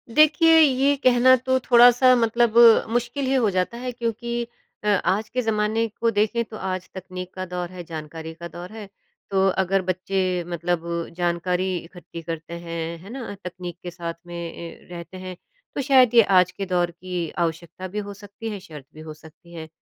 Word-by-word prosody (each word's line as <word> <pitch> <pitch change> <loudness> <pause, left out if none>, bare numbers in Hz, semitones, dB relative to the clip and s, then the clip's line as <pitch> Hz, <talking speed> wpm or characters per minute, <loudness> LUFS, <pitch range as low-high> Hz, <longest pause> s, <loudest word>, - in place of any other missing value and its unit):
देखिए, 310 +2 +6
ये 280 -1 +4
कहना 255 +1 +6
तो 260 +1 0
थोड़ा-सा 245 +1 +6
मतलब 235 -1 +2 0.3
मुश्किल 240 +4 -1
ही 260 - 0
हो 245 -5 +3
जाता 185 +5 -1
है 250 +1 -4
क्योंकि 235 0 -3 0.4
अ, - - -3
आज 205 +1 +1
के 250 - -1
ज़माने 220 0 0
को 230 - +3
देखें 220 +2 +1
तो 220 0 -10
आज 185 -2 -4
तकनीक 185 -1 -7
का 185 0 -4
दौर 180 -1 -4
है, 180 -1 -8
जानकारी 160 0 -7
का 170 +1 -8
दौर 175 +2 -9
है। 220 -1 -8 0.5
तो 195 0 +3 0.2
अगर 195 +1 +1
बच्चे 185 0 -1
मतलब 175 0 -2 0.4
जानकारी 180 +1 0
इकट्ठी 170 0 -10
करते 165 0 -6
हैं, 170 -1 -5
है 190 +4 -13
ना? 240 -4 -6
तकनीक 180 -1 -7
के 175 - -6
साथ 170 -1 -5
में 175 - -8
ए, 170 0 -8
रहते 175 +1 -8
हैं, 185 0 -7 0.4
तो - - -1
शायद 260 -3 +5
ये 230 - +9 0.2
आज 180 0 +2
के 195 - -5
दौर 175 -2 0
की 175 -1 -5 0.2
आवश्यकता 170 +3 -6
भी 205 +3 -4
हो 205 - -6
सकती 205 +3 -9
है, 205 -2 -5
शर्त 150 -6 -12
भी 155 - -11
हो 155 -1 -8
सकती 160 +2 -17
है 160 -1 -7
185 Hz, 190 wpm, -23 LUFS, 175-235 Hz, 0.5 s, ये